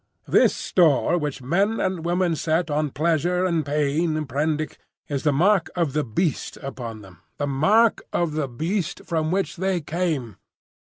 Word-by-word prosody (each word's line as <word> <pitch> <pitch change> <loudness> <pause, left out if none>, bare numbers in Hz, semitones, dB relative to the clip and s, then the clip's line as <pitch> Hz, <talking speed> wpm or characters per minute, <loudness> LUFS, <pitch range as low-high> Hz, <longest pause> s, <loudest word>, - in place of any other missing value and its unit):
This - - +4
store 165 -2 +3
which 145 -4 -4
men 195 - +1
and 185 -3 -1
women 175 0 +1
set 160 +1 0
on 150 0 0
pleasure 170 +5 +1
and 170 -3 +1
pain, 150 +2 0
Prendick, 150 +3 -2 0.3
is 140 -2 -2
the 150 - +2
mark 180 +5 +3
of 165 -6 0
the 150 - +1
beast 145 - -2
upon 120 -5 -6
them,—the 95 - -8
mark 200 +12 +3
of 170 -2 0
the 150 -2 -1
beast 165 - -3
from 160 -3 -1
which 195 +2 -1
they 190 0 0
came! 155 - -2
155 Hz, 155 wpm, -24 LUFS, 145-175 Hz, 0.3 s, This